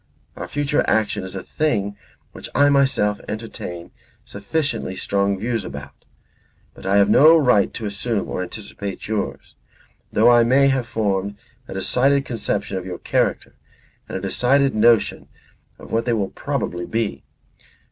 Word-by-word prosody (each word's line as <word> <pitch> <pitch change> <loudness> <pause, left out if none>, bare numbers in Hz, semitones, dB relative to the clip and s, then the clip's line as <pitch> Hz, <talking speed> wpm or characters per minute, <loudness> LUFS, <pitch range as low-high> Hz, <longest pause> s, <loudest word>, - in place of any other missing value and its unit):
Our - - -6
future 145 +1 0
action 110 -3 +1
is 95 +1 -6
a 95 - -5
thing 125 -11 0
about 100 0 -21
which - - -9
I 145 0 +5
myself 135 -7 +2
entertain 105 -6 -6 0.3
sufficiently 105 0 -3
strong 100 +1 0
views; 115 +1 -2
but 70 +4 -13
I 100 +1 +3
have 100 0 +5
no 155 +10 +7
right 125 -9 +3
to 115 - -5
assume 105 +2 -2
or - - -4
to - - -2
anticipate 100 -1 -7
yours, 110 -1 -4 0.6
though 115 +3 +5
I 120 0 +6
may 135 +4 +4
have 130 -3 0
formed 100 -4 -1 0.3
a - - -8
decided 135 +8 +2
conception 100 -4 -2
of 90 - -5
your 90 -1 -5
character - - -1 0.6
and - - -3
a - - -6
decided 135 +8 +2
notion 115 0 +3 0.5
of - - -13
what 115 +1 0
they 120 - +1
will 100 -4 -1
probably 90 0 -3
be. 110 -11 -2
110 Hz, 155 wpm, -21 LUFS, 100-125 Hz, 0.6 s, no